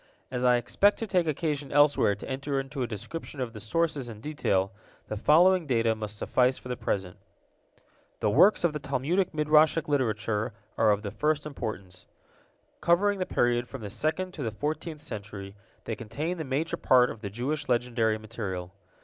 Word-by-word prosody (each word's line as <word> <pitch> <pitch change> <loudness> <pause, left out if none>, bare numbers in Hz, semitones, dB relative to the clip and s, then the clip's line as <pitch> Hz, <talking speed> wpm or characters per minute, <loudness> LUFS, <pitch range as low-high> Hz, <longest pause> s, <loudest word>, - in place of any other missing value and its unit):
As 125 -1 -2
I 125 -1 +5
expect 200 - +2
to 225 - -3
take 180 -5 +1
occasion 145 -2 -2
elsewhere 145 -7 +4
to 100 - -9
enter 135 +1 -2
into 135 +1 -5
a 125 - 0
description 135 - -7
of 125 -3 -3
the 110 - -8
sources 145 +2 -1
in 110 -2 -9
detail, 100 -9 0 0.4
the - - -2
following 170 - +4
data 115 -3 +2
must 105 -1 -6
suffice 125 +4 +2
for 125 - -11
the 125 - -1
present. 95 -6 -3 1.0
The 105 - +1
works 195 - +5
of 170 -3 +2
the 150 - -3
Talmudic 170 +8 0
Midrashic 155 +1 +3
literature 115 -5 0 0.2
are 110 - +3
of 105 0 +2
the 100 - -4
first 150 +6 0
importance. 100 -10 -6 0.7
Covering 200 +4 +3
the 185 - -1
period 120 0 +1
from 135 -1 -8
the 105 -2 -6
second 180 - -1
to 155 - -7
the 115 - -1
fourteenth 150 +6 -4
century, 100 -7 -7 0.3
they - - -3
contain 155 - -4
the 160 - -3
major 140 +5 -1
part 125 -1 +4
of 110 - -10
the 100 - -4
Jewish 135 +7 -3
legendary 120 -2 +1
material. 100 -5 -5
130 Hz, 180 wpm, -28 LUFS, 110-155 Hz, 1.0 s, I